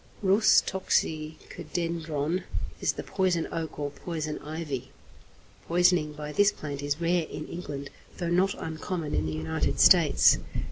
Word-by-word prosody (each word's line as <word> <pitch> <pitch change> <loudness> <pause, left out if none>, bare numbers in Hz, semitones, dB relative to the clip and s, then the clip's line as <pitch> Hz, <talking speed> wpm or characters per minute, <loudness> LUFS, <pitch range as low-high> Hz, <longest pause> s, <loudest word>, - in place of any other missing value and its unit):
=Rhus 200 +3 +5
toxicodendron= 160 -1 -2 0.4
is - - +2
the - - -6
poison 180 -3 0
oak 165 -1 -4
or 145 -1 -3
poison 155 -1 -4
ivy. 150 -3 -5 0.8
Poisoning 175 -3 +3
by 150 0 -6
this 205 +6 +4
plant 145 -2 -6
is 145 +1 -1
rare 170 -1 +1
in 155 - -6
England, 140 -5 -6 0.3
though 170 -2 -2
not 190 +3 +2
uncommon 160 0 -4
in 80 +1 0
the - - -2
United 80 +1 -2
States. - - +6
160 Hz, 135 wpm, -28 LUFS, 150-175 Hz, 0.8 s, States